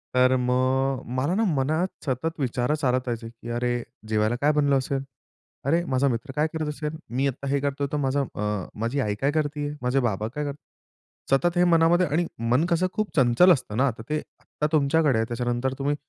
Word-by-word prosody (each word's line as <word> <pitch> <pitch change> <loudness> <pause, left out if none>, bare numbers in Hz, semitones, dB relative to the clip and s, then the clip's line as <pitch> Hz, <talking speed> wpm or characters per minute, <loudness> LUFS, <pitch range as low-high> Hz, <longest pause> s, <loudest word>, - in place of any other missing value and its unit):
तर 130 0 +5
मग 130 +1 +1 0.2
मला 140 +8 +1
ना 220 - +2
मनात 155 +7 +1 0.2
सतत 155 +4 -2
विचार 125 +1 0
चालतायचे 125 -4 -1
की 115 0 -11
"अरे! 120 0 -1 0.2
जेवायला 110 +1 +1
काय 145 +1 +4
बनलं 145 -2 +3
असेल? 135 +1 -2 0.6
अरे 165 +5 +2
माझा 130 +2 +3
मित्र 120 +1 -2
काय 150 +1 +2
करत 160 -1 -2
असेल? 150 +1 -4
मी 130 +4 0
आता 140 +1 -4
हे 140 +1 +2
करतोय 140 0 -1
तर 150 - 0
माझा 140 0 +1
अ, 105 -2 -2
माझी 115 +5 -1
आई 105 -6 0
काय 140 +1 +2
करतीये? 145 -1 -1
माझे 125 +2 +1
बाबा 110 -4 -1
काय 145 +6 -4
करतायत?" 145 0 -12
सतत 175 +6 +2
हे 175 - +5
मनामध्ये. 175 +1 +4
आणि 160 +4 +1 0.3
मन 135 +7 +4
कसं 175 +1 +2
खूप 215 -1 -3
चंचल 130 +6 +5
असतं 120 -7 -4
ना. 135 +2 +3
तर - - -7
ते 155 - +1 0.2
आत्ता 150 - -3
तुमच्याकडे 150 -3 +3
आहे 110 - +1
त्याच्यानंतर 120 +2 -1
तुम्ही 145 +1 0
135 Hz, 195 wpm, -25 LUFS, 125-150 Hz, 0.6 s, तर